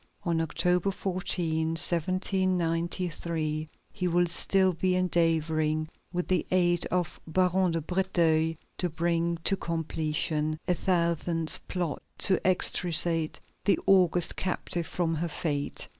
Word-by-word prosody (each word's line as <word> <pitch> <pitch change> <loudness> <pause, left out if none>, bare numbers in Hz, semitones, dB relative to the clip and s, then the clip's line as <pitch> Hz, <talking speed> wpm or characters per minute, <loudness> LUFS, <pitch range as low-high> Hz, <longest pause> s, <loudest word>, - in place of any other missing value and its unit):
On 165 -2 0
October 180 +3 +1
14, 180 -4 -1
1793, 170 -3 -1 0.2
he 185 -3 -2
will 175 0 +3
still 190 +2 +1
be 180 +2 0
endeavoring, 160 -3 +1 0.2
with 180 0 -2
the 185 -3 +1
aid 175 -2 +2
of 180 -2 -2
Baron 185 +2 +2
de 165 - -1
Breteuil, 165 -2 +1 0.2
to 180 - 0
bring 170 +1 0
to 195 - +3
completion 155 -2 -2
a 180 - +3
thousandth 170 -2 +1
plot 175 -5 -3 0.2
to 190 -3 +3
extricate 165 -3 +2 0.3
the 200 - +4
august 180 -3 +5
captive 175 -2 -2
from 170 -2 -1
her 165 +2 -2
fate. 145 -2 -2
170 Hz, 115 wpm, -28 LUFS, 160-180 Hz, 0.3 s, august